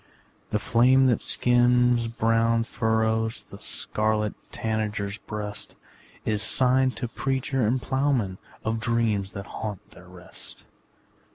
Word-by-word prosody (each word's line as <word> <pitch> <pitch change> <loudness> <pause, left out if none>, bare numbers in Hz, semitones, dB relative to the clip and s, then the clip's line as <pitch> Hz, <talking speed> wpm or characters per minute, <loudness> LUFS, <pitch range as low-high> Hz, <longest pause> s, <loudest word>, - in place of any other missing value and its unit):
The - - +1
flame 125 +5 +4
that 125 -3 +2
skims 125 -1 +3
brown 115 0 +2
furrows 110 -1 0
The - - -13
scarlet 105 -1 -1 0.2
tanager's 105 -2 -2
breast, 105 -1 -6 0.5
Is 105 -1 0
sign 130 +4 +3
to 120 - -2
preacher 130 -1 -1
and 125 +4 +1
ploughman 130 -8 0 0.3
Of 110 +1 0
dreams 115 -4 0
that 100 -1 -6
haunt 105 -4 -7
their - - -14
rest. - - -12
115 Hz, 115 wpm, -26 LUFS, 105-125 Hz, 0.5 s, flame